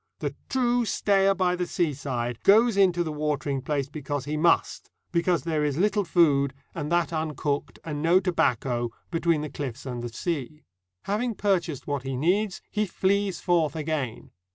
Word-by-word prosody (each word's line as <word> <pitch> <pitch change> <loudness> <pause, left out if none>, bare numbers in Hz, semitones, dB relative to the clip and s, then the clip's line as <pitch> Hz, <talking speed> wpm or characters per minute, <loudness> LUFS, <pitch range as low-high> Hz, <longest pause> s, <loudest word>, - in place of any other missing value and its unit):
The - - -3 0.2
true 245 -2 +2
stayer 195 -3 +2
by 180 -1 +1
the 180 0 -2
seaside 135 -8 -2
goes 220 +3 +5
into 180 -3 +3
the 160 - -4
watering 150 -2 -1
place 140 0 -1
because 145 -2 -4
he 150 +1 -2
must; 165 +2 +1 0.2
because 170 -3 +1
there 155 -3 0
is 145 -1 0
little 205 +2 +2
food, 140 -6 +3 0.2
and 150 -3 -4
that 170 -2 +1
uncooked, 150 -2 -2
and 150 -2 -4
no 170 +4 +5
tobacco, 125 - 0 0.2
between 165 -2 +1
the 150 - -3
cliffs 135 -5 -5
and 125 -2 -4
the 120 - -4
sea. 150 +3 -4 0.4
Having 220 +3 -1
purchased 180 -9 0
what 145 -2 -2
he 135 0 -4
needs 185 +7 0
he 210 -1 0
flees 195 +1 0
forth 170 -4 +1
again. 150 -6 -3
160 Hz, 165 wpm, -26 LUFS, 140-185 Hz, 0.4 s, goes